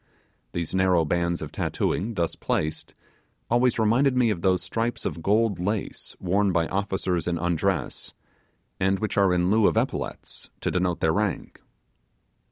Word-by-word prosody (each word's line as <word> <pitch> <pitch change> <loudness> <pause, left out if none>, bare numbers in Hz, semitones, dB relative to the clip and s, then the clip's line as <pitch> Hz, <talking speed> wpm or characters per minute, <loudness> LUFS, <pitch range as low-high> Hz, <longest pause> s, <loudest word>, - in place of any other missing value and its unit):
These 85 -2 -3
narrow 95 -3 +3
bands 85 +2 0
of - - -7
tattooing, 110 +4 -1
thus 85 -3 -1
placed, 75 0 -2 0.6
always 120 0 +3
reminded 125 +4 +3
me 120 -3 +4
of 90 -5 -3
those 90 -1 +2
stripes 115 +5 -2
of 85 - -3
gold 105 0 +2
lace 100 +3 -3
worn 95 +2 +1
by 85 -2 +2
officers 95 -3 -1
in 85 -1 0
undress, 85 -1 -1 0.6
and 95 +1 +2
which 110 +1 -3
are 100 -2 +4
in 90 +1 +2
lieu 110 -1 +5
of - - +1
epaulettes - - -3
to - - -1
denote 90 -1 0
their 80 -1 +3
rank. 105 -1 -2
95 Hz, 155 wpm, -25 LUFS, 85-105 Hz, 0.6 s, lieu